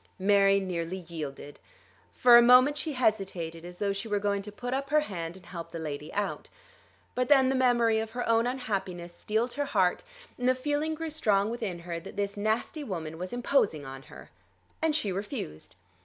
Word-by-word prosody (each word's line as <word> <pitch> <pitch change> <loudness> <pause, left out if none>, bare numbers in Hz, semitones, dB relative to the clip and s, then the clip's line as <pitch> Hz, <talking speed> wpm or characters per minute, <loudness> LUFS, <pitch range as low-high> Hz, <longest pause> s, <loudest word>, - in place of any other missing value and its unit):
Mary 195 0 +4
nearly 180 -1 -3
yielded. 155 -5 -7 0.6
For 245 -1 +7
a 240 - +10
moment 250 +4 +7
she 300 0 -3
hesitated 195 -9 -1
as 175 0 -10
though 200 0 0
she 200 +3 -5
were 210 -1 0
going 200 0 0
to 210 +1 -9
put 245 +4 -5
up 275 +1 -2
her 305 0 +4
hand 175 - -5
and 185 - -15
help 170 -1 -7
the - - -5
lady 150 -2 -5
out. 205 0 -3 0.6
But 250 0 -1
then 265 -3 +6
the 265 - +1
memory 240 -3 +3
of 220 0 -3
her 245 +2 -4
own 230 +1 +3
unhappiness 195 -8 -3
steeled 220 +6 -1
her 285 +2 -1
heart, 185 -10 +2 0.4
and 250 +1 +2
the 255 - +4
feeling 295 +4 -1
grew 325 0 -4
strong 215 -9 +2
within 220 -7 -3
her 170 0 -5
that 165 - -11
this 200 0 -1
nasty 220 +8 -1
woman 160 - -5
was 180 +1 -5
imposing 245 - +1
on 135 0 -8
her, 150 - -14 0.5
and 320 -2 +2
she 215 -10 0
refused. 180 - -6
205 Hz, 195 wpm, -29 LUFS, 175-250 Hz, 0.6 s, a